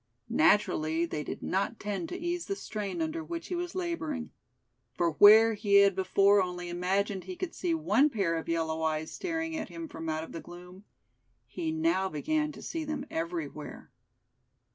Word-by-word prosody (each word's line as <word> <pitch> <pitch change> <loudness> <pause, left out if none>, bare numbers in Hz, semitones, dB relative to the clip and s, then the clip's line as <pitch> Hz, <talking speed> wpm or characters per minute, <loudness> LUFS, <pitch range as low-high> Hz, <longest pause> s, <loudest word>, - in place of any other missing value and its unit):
Naturally 165 -5 +3
they 155 -3 -4
did - - -6
not 200 +4 -1
tend 195 -5 -3
to - - -4
ease 345 0 -3
the 395 - -1
strain 215 - -4
under 320 +1 -3
which 335 +1 -6
he 360 - -2
was 355 +1 -4
laboring; 315 -8 -3 0.6
for 170 -1 +1
where 220 +7 +8
he 205 -1 +1
had 200 -1 +6
before 195 +1 +4
only 180 -1 -4
imagined 190 +2 -1
he 185 -1 -6
could 355 - -4
see 345 -3 -1
one 300 -2 +3
pair 195 - 0
of 165 - -4
yellow 160 -1 -1
eyes 155 0 -1
staring 325 -3 -3
at - - -4
him 335 -1 -7
from 165 - -6
out 155 +1 -3
the 165 - -6
gloom, 180 +3 -12 0.6
he 325 -2 -4
now 320 - +1
began 305 - -1
to - - -11
see 325 -1 -3
them 295 -3 -4
everywhere. 330 +1 -5
205 Hz, 175 wpm, -30 LUFS, -, 0.6 s, where